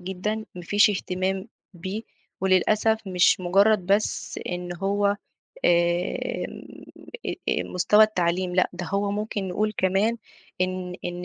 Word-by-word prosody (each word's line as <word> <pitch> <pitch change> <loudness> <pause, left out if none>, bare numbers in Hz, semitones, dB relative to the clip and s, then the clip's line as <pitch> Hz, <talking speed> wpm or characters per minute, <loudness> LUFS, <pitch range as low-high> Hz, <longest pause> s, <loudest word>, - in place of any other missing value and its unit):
جدًا، 190 +3 -3 0.2
ما 180 - -8
فيش 205 +3 +4
اهتمام 190 0 -2 0.3
بيه 190 +6 -5 0.4
وللأسف 215 +4 +3
مش 185 0 +3
مُجرّد 195 +1 +3
بس 200 +2 0
إن 175 0 -4
هو 200 +2 0
آآ 200 0 +2 0.5
إن 175 +1 0 0.8
آآ - - +1
مستوى 210 +4 +4
التعليم 180 -3 0
لأ، 185 - +3
ده 175 0 -6
هو 200 +3 0
ممكن 205 -1 -3
نقول 210 +4 0
كمان 195 +5 +2 0.4
إن 185 -1 -2
إن 175 0 -4
190 Hz, 130 wpm, -25 LUFS, 180-205 Hz, 0.8 s, فيش